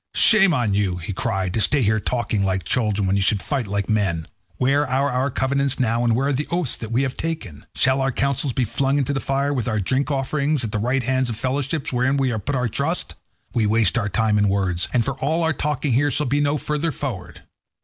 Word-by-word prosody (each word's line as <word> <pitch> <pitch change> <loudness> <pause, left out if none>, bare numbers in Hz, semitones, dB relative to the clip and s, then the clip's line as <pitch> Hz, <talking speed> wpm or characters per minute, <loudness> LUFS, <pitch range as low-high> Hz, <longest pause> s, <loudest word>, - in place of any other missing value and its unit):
"Shame 195 -4 +6
on 120 -9 +1
you," 100 -3 0
he 90 +3 -5
cried, 95 -1 -2
"to 110 - +1
stay 140 +4 +4 0.2
talking 120 0 -1
here 100 - +1
like 95 -1 -1
children, 105 -2 0
when 95 +1 +1
you - - +1
should 100 +2 +2
fight 130 +1 -2
like 100 0 -2
men. 95 -7 0 0.3
Where 135 +3 +2
are 135 +3 +1
our 130 +2 0
covenants 140 +1 0
now, 120 -1 +1
and 115 -2 +2
where 135 +3 +1
the 145 +3 -2
oaths 170 -6 0
that 110 -1 -7
we 125 +4 +1
have 130 -1 -2
taken? 160 - -5
Shall 130 +1 +3
our 135 0 +1
counsels 140 +1 0
be 125 +1 0
flung 135 +5 0
into 140 0 0
the 135 - -1
fire, 140 +2 -1
with 125 -3 -2
our 110 -2 0
drink 130 +9 0
offerings 140 0 0
and 110 - -3
the 105 - -1
right 125 +4 0
hands 130 0 0
of 110 - -4
fellowship 135 +4 -2
wherein 125 +3 +1
we 135 -1 +1
have 110 -4 -4
put 145 - -1
our 125 -1 0
trust? 140 - -1 0.4
We 110 -3 +1
waste 110 +1 +2
our 110 -4 0
time 105 +1 +1
in 105 -1 +3
words, 95 -3 -1
and 120 -2 +1
for 135 - -1
all 160 +5 0
our 160 0 +2
talking 145 -1 -1
here 145 +4 +2
shall 150 +1 +1
be 140 +3 0
no 145 +1 +1
further 150 +3 -2
forward. 120 -12 -6
130 Hz, 240 wpm, -22 LUFS, 105-140 Hz, 0.4 s, Shame